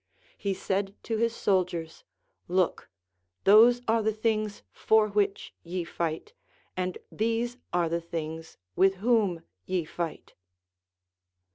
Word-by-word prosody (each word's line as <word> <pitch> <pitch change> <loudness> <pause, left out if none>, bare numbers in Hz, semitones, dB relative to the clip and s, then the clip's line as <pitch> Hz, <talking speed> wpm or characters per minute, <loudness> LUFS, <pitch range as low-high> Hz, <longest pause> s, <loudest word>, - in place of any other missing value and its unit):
He 200 -1 -2
said 195 +1 -2
to 225 - -2
his 230 +1 +1
soldiers, 175 -6 -1 0.4
Look, 180 0 0 0.5
those 235 +5 +7
are 225 +1 +3
the 220 0 +1
things 215 -1 -1
for 220 -1 +3
which 200 -1 0
ye 175 +1 -4
fight, 170 - -4 0.4
and 185 -1 -2
these 230 +2 -1
are 175 -1 +2
the 170 +1 -1
things 160 -1 -6 0.2
with 195 0 +4
whom 200 -5 +1 0.2
ye 180 -3 0
fight. 170 +1 -5
195 Hz, 120 wpm, -28 LUFS, 170-220 Hz, 0.5 s, those